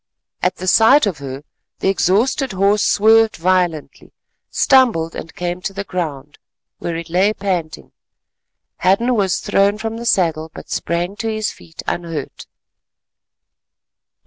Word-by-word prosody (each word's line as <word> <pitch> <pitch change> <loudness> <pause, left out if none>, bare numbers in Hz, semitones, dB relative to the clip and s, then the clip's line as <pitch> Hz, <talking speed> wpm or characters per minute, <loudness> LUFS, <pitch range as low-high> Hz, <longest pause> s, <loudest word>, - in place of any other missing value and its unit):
At 180 0 +1
the 185 - -7
sight 225 +8 +5
of 185 -8 -3
her 135 0 -7 0.3
the - - -2
exhausted 200 - +1
horse 200 +2 +2
swerved 220 +1 +4
violently, 175 -3 -1 0.4
stumbled 230 - +3
and 160 - -8
came 175 0 -4
to 195 - -4
the 200 +1 -4
ground, 150 -7 -5 0.4
where 170 - -4
it 165 0 -5
lay 185 +5 +2
panting. 185 -6 -4 0.9
Hadden 215 +7 +2
was 195 -5 0
thrown 200 +1 +2
from 225 +1 -4
the 235 0 -5
saddle 160 -6 +1
but - - -11
sprang 175 +3 -2
to 225 - -3
his 215 -1 -2
feet 165 - -12
unhurt. 165 -5 -5
185 Hz, 135 wpm, -18 LUFS, 165-210 Hz, 0.9 s, sight